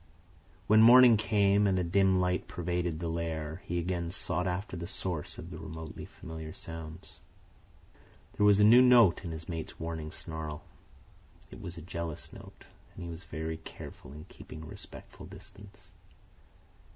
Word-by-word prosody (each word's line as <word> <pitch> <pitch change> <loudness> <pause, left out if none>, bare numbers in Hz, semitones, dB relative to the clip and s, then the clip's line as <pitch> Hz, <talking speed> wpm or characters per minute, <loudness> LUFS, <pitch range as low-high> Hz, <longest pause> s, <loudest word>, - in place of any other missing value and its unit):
When 110 +1 +6
morning 120 +1 +9
came 105 -1 +3
and 95 -1 +2
a 90 - +1
dim 95 +2 +3
light 90 0 0
pervaded 85 -2 -2
the 85 - -3
lair, 80 0 -3
he 85 - -2
again 85 -1 -2
sought 90 +1 -2
after 95 +2 -3
the 85 -1 -5
source 90 -5 -3
of 85 +3 -9
the 80 - -7
remotely 80 -1 -8
familiar 80 -1 -9
sounds. 80 +1 -9 1.1
There - - 0
was 100 -1 +6
a - - +6
new 115 +4 +8
note 120 -8 +6
in 85 - -5
his 80 0 -7
mate's 80 -2 -6
warning 80 -1 -5
snarl. 80 -2 -6 0.9
It - - -10
was 85 0 -7
a 80 - -8
jealous 85 -2 -6
note, - - -13 0.3
and - - -8
he 85 - -6
was 85 +3 -8
very 80 +1 -4
careful 80 -4 -11
in 75 +3 -10
keeping 80 -3 -11
a - - -9
respectful - - -10
distance. 100 -2 -15
85 Hz, 165 wpm, -30 LUFS, 80-95 Hz, 1.1 s, morning